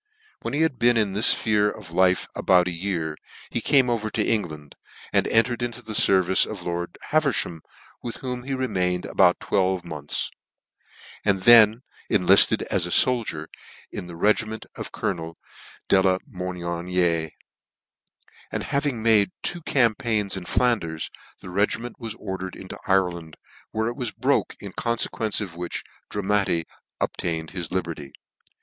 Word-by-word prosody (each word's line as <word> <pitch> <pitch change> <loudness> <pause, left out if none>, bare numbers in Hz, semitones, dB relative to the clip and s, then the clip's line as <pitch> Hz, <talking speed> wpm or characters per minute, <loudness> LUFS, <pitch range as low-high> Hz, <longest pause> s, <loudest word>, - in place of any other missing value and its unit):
When - - -3
he 150 - +1
had 160 -6 +1
been 120 0 +4
in 105 -3 +1
this 105 +3 +5
fphere 105 -1 +2
of 100 -6 -11
life 90 +1 +2
about 90 -1 +3
a - - -1
year, 85 -3 -3 0.4
he 120 - -1
came 135 +2 +4
over 115 -3 -1
to 105 0 -1
England, 75 -10 -3 0.4
and - - +3
en 115 - +5
tered 120 0 -5
into 120 0 -4
the 110 -1 -6
fervice 95 -2 +4
of - - -5
lord 85 0 -4
Haverfham, 140 - +1 0.4
with 120 - -5
whom 125 -1 -5
he 135 +2 -3
remained 90 -9 -1
about - - +3
twelve 95 -2 0
months, 75 -4 -4 0.9
and 95 -2 +1
then 115 +1 +7 0.3
enlifted 95 -1 +5
as 90 -2 -1
a - - -6
foldier 115 - +2 0.5
in 90 - -6
the 85 - -9
regiment 110 +4 0
of - - -7
Colo 85 -3 -3
nel - - -60 0.5
De 95 - +5
la 95 -1 +3
Meloniere; 90 - -1 1.2
and - - -3
having 140 -5 -1
made 110 -4 +4
two 175 - -2
cam 120 -7 +2
paigns 105 -3 -1
in 95 -2 -6
Flanders, 85 -12 0 0.3
the 90 - -9
regiment 105 +5 -1
was 115 -3 -5
ordered 95 -3 -6
^into 95 - -9
Ireland, 90 -5 0 0.3
where 110 0 -1
it 120 - -3
was 125 -5 -3
broke, - - 0
in 100 -1 -9
confequence 115 -2 -1
of 95 -5 -6
which 85 0 -5 0.3
Dramatti 100 -4 0 0.3
obtained 80 -2 -2
his 90 -4 -5
liberty. 85 -6 -4
95 Hz, 155 wpm, -24 LUFS, 90-115 Hz, 1.2 s, then